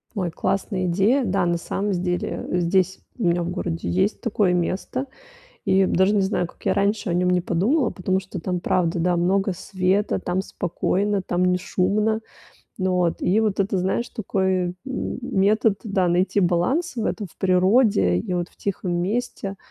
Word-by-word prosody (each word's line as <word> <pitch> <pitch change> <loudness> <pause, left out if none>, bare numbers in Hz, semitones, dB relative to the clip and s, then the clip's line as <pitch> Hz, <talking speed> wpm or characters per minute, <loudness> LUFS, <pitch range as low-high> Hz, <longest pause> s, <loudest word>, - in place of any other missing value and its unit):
Ой, 185 -4 -1
классная 190 +2 -1
идея. 200 +10 +2
Да, 195 -2 +1
на 170 0 +1
самом 200 +4 -2
с - - 0
деле, 180 0 -2
здесь 180 +1 +1 0.2
у 240 - -4
меня 175 0 +2
в 170 - -3
городе 175 -2 -3
есть 190 +4 0
такое 205 -6 +1
место. 185 +9 -2 0.6
И 190 0 +3
даже 190 +2 +3
не 200 - +3
знаю, 190 -2 0
как - - -19
я - - +3
раньше 200 0 0
о - - 0
нём 180 +1 +2
не 180 0 +2
подумала, 220 - +1
потому 185 0 -1
что 190 0 -7
там, 180 +2 -2
правда, 175 -1 0
да, 175 +1 +2
много 190 +2 +1
света, 190 +3 0
там 180 +1 -1
спокойно, 195 +3 -1
там 180 0 0
не 180 0 +3
шумно. 210 +4 0 0.6
Ну 185 0 +1
вот, 180 -2 0
и 195 +4 +3
вот 215 -3 0
это, 195 0 +1
знаешь, 190 +6 -1
такой, 190 -3 0 0.2
м, 265 -1 -4
метод, 210 -2 +2
да, 195 -4 +1
найти 180 +3 +2
баланс 200 - +1
в 225 -2 -2
этом, 210 -3 -2
в - - -24
природе 185 - +3
и 95 - -3
вот 175 -1 -2
в - - -28
тихом 190 -2 -3
месте. 200 0 -2
190 Hz, 185 wpm, -23 LUFS, 180-205 Hz, 0.6 s, И